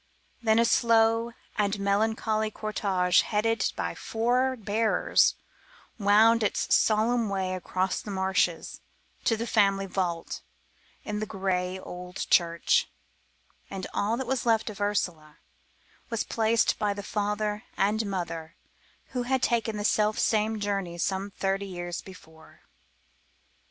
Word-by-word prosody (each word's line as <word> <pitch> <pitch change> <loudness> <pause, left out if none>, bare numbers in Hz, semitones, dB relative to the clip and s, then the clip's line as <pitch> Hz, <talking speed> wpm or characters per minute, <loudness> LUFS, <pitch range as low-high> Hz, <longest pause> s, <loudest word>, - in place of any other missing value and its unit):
Then 220 -1 +3
a 230 - +5
slow 230 0 +3 0.3
and 205 0 +1
melancholy 215 +2 +1
cortege 195 -4 +1
headed 225 +2 0
by - - -2
four 250 +3 0
bearers 220 +1 +2 0.6
wound 220 +3 +5
its 210 - 0
solemn 225 +1 +3
way 190 -1 -1
across 185 0 -2
the - - -9
marshes 190 -3 0 0.5
to 225 - +2
the 230 - -3
family 195 -4 +2
vault 180 -3 -3 0.6
in 210 0 -3
the 215 - -3
grey 190 -2 -1
old 180 -1 -9 0.2
church, 170 -1 +3 0.8
and 190 -1 -5
all 215 +3 0
that 265 - -3
was 260 0 -1
left 225 -2 +1
of 205 -1 -10
Ursula 175 -7 -2 0.7
was 230 -3 -1
placed 225 0 +1
by 205 -2 0
the 205 - -6
father 210 0 -2
and 210 +3 +2
mother 170 -4 -4 0.5
who 250 - -2
had 255 +1 0
taken 225 -3 +1
that 205 - -3
self 215 0 +2
same 220 0 +1
journey 195 -4 -2
some 190 +3 -1
thirty 195 0 -2
years 175 -2 -5
before. 160 -4 -15
205 Hz, 130 wpm, -27 LUFS, 190-225 Hz, 0.8 s, a